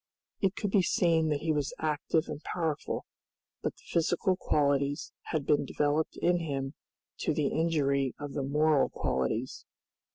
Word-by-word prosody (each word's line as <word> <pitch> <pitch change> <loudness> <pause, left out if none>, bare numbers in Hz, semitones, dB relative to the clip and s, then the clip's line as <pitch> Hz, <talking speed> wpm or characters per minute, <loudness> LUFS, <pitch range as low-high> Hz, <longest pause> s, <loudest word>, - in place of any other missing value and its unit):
It 195 0 +2
could 205 -3 -2
be 195 - +5
seen 170 -5 +2
that 150 -1 0
he 160 - +1
was 145 -2 -1
active 155 +1 0
and 150 -1 -6
powerful, 160 -4 -2 0.6
but - - -2
the - - -22
physical 175 +3 +1
qualities 145 -3 +1
had 155 -4 -2
been 150 - +3
developed 150 +2 0
in 175 0 +2
him 140 -4 -3 0.5
to 155 - 0
the 145 -3 +1
injury 140 -5 +1
of 145 -1 -5
the 140 - -1
moral 150 +2 +3
qualities. 110 - -2
150 Hz, 155 wpm, -30 LUFS, 140-165 Hz, 0.6 s, be